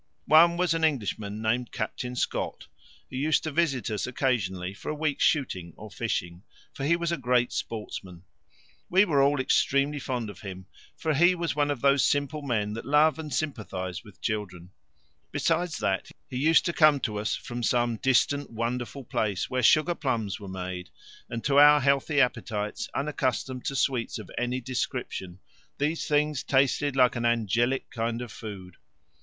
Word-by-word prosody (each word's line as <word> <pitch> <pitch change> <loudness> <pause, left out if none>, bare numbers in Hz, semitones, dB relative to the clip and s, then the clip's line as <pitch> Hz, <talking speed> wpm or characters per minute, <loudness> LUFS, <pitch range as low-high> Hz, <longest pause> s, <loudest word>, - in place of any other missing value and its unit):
One 170 +2 +6
was 180 -2 +2
an 165 0 -1
Englishman 110 -7 -1
named 120 +2 0
Captain 125 +3 -4
Scott, - - -2 0.5
who - - -5
used 150 +3 +2
to 155 - -3
visit 140 -7 0
us 105 - -2
occasionally 95 -8 -1
for - - -8
a 155 - -2
week's 150 -2 -1
shooting 95 - 0
or 105 0 -10
fishing, 90 -5 -3 0.3
for 135 - -4
he 165 +4 +4
was 170 0 -2
a 170 - 0
great 125 -2 +1
sportsman. 95 -5 -6 0.7
We 190 +3 +5
were 145 -7 +2
all 140 0 +3
extremely 140 +2 +2
fond 125 -5 -3
of 95 - -15
him, 95 -2 -8 0.3
for 160 -1 0
he 175 +5 +5
was 170 -4 -2
one 145 -1 +1
of 140 -4 -2
those 140 -1 +4
simple 145 +1 0
men 110 -7 -1
that 115 - -6
love 150 +3 +4
and 155 -2 -6
sympathize 105 - -3
with 105 -4 -16
children; 95 -5 -4 0.6
besides 165 0 0
that, 95 -1 -1 0.2
he 125 - -5
used 160 +5 +4
to 170 - 0
come 155 -3 +5
to 105 -3 -2
us 105 -2 -1
from 120 0 -6
some 120 -1 +1
distant 135 +3 +2
wonderful 120 +4 -3
place 105 -5 -2
where 130 0 0
sugar 155 +7 +4
plums 115 - -2
were 100 - -9
made, 90 -2 -5 0.4
and 115 -1 -5
to 140 0 +4
our 150 0 +8
healthy 140 +2 +2
appetites, 110 -5 -1
unaccustomed 130 -3 -2
to 135 - -2
sweets 130 -3 0
of 105 -4 -10
any 125 +1 -1
description, 105 -7 -4 0.4
these 150 +3 -1
things 150 -1 +1
tasted 140 +1 +1
like 130 -1 +4
an 120 - -2
angelic 120 +2 +1
kind 115 +1 -2
of 120 - -9
food. 95 -5 -9
125 Hz, 170 wpm, -27 LUFS, 110-145 Hz, 0.7 s, our